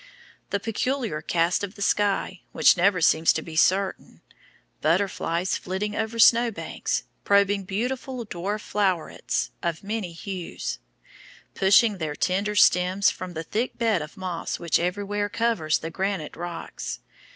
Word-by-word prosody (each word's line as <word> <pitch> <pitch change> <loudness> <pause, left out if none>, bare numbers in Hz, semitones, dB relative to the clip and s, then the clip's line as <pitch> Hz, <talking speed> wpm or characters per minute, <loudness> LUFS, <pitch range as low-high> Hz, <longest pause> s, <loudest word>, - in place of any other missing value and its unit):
The 200 - 0
peculiar 225 - -2
cast 170 +3 +1
of 200 0 -5
the 200 - -11
sky, 200 -3 0
which - - +6
never 180 0 +3
seems 160 0 +5
to 160 - -3
be 160 - -9
certain, 190 +4 +1 0.6
butterflies 175 0 0
flitting 205 +3 -3
over 220 +1 -2
snowbanks, 230 0 +3 0.2
probing 200 -1 +3
beautiful 245 +5 -3
dwarf 200 +2 -3
flowerets 190 -6 -1
of 170 0 -2
many 205 -3 -3
hues, 180 +1 -5 0.7
pushing 200 +1 +4
their 155 -2 -3
tender, 200 +5 0
stems 185 0 +4
from 185 -1 -7
the 160 0 -4
thick 225 +10 -2
bed 220 -7 +1
of 150 - -9
moss 185 -3 -3
which 170 -2 +1
everywhere 205 +3 -1
covers 215 -9 +1
the 165 - -6
granite 190 -3 -2
rocks. 170 - -6
195 Hz, 135 wpm, -25 LUFS, 170-210 Hz, 0.7 s, which